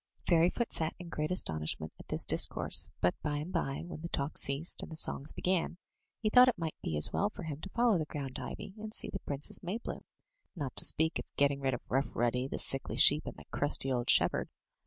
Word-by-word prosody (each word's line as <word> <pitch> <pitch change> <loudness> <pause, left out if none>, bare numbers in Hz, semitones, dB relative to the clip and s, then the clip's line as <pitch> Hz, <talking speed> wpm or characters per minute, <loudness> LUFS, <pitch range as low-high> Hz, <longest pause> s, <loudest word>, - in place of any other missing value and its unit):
Fairyfoot 175 +7 +2
sat 160 0 0
in 175 -1 -10
great 155 -1 -3
astonishment 80 - -2
at - - -13
this - - 0
discourse, - - +3
but 90 - +2
by 145 -1 -2
and 155 +6 -6
by, 140 -5 -2
when 175 -3 -9
the 170 - -6
talk 140 0 -3
ceased 140 +5 +4
and - - -9
the - - -7
songs 155 -1 +2
began, 180 -1 -2 0.5
he - - +1
thought 250 +4 +7
it 250 - +1
might 165 -2 -4
be 80 - -3
as 75 - +4
well 205 - 0
for 210 - -10
him 155 -2 -6
to 195 - -8
follow 235 -3 +2
the 155 - -2
ground 140 -3 -6
ivy, 190 - -8
and 215 0 -7
see - - -2
the 195 - -5
Princess 140 -3 -4
Maybloom, 195 +7 -5 0.5
not 145 -7 -5
to - - +8
speak 160 +1 +2
of - - -6
getting 140 -1 +2
rid 135 -2 0
of - - -9
Rough 135 +2 -1
Ruddy, 125 +2 0
the - - -5
sickly 135 - +4
sheep, 150 +2 +5
and - - -7
the - - -13
crusty 140 -2 0
old 120 -1 -2
shepherd. - - +2
155 Hz, 225 wpm, -31 LUFS, 135-180 Hz, 0.5 s, to